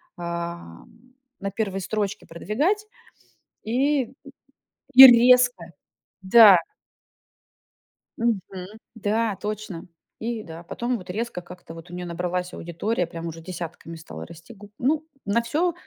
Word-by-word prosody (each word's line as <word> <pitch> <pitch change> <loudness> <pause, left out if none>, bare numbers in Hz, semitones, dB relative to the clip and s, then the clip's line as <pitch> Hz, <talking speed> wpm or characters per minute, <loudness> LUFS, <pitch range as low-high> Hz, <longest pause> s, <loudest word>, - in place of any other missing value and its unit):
ам, 170 - -8 0.3
на 200 0 -3
1 195 -2 -3
строчке 205 +1 -3
продвигать 285 - -1 0.8
и 260 +3 0 0.8
и 265 +1 +13
резко, 245 -4 +5 0.6
да 200 0 +8 1.6
мгм, 230 -4 0 0.5
да, 220 0 -1
точно. 210 -5 -5 0.3
И, 225 -1 -4
да 165 -1 -10
потом 240 +8 -3
вот 185 - -13
резко 215 -1 -4
как-то 175 -1 -12
вот 165 +2 -12
у - - -12
неё 180 0 -5
набралась 180 +1 -3
аудитория, 175 +3 -3
прям 165 0 -8
уже 165 0 -8
десятками 170 -1 -8
стала 80 - -9
расти. 165 +8 -13
Г 205 -1 -14
ну, 295 +5 0 0.2
на 205 +4 +1
всё, 315 +9 0
200 Hz, 120 wpm, -24 LUFS, 170-235 Hz, 1.6 s, и